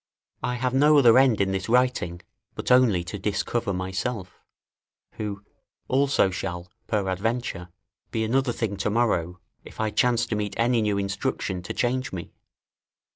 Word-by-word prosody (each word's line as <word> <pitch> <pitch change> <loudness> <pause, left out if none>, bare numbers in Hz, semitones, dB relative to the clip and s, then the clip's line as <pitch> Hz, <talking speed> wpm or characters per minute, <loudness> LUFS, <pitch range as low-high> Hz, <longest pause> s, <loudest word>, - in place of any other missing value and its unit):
I 125 - -1
have 125 +1 -1
no 150 +3 +5
other 125 -3 +7
end 130 -5 +4
in 95 -1 +1
this 95 +2 -3
writing, 125 -9 +1 0.3
but - - -3
only 120 -9 +5
to 95 +4 -6
discover 105 +2 -1
myself, 95 +2 -4 0.7
who, 100 -2 -5 0.4
also 135 -7 +2
shall, 90 -1 -5 0.2
peradventure, 100 -1 -2 0.4
be 110 - -1
another 130 +3 +1
thing 110 -4 -3
to 100 - -1
morrow, 95 -6 0 0.2
if - - -13
I 110 -1 0
chance 120 +1 +2
to 115 - -3
meet 105 -1 -3
any 120 0 +2
new 105 -2 0
instruction 100 -1 -2
to 90 - -6
change 130 +1 0
me. 85 -3 -7
110 Hz, 150 wpm, -25 LUFS, 95-125 Hz, 0.7 s, other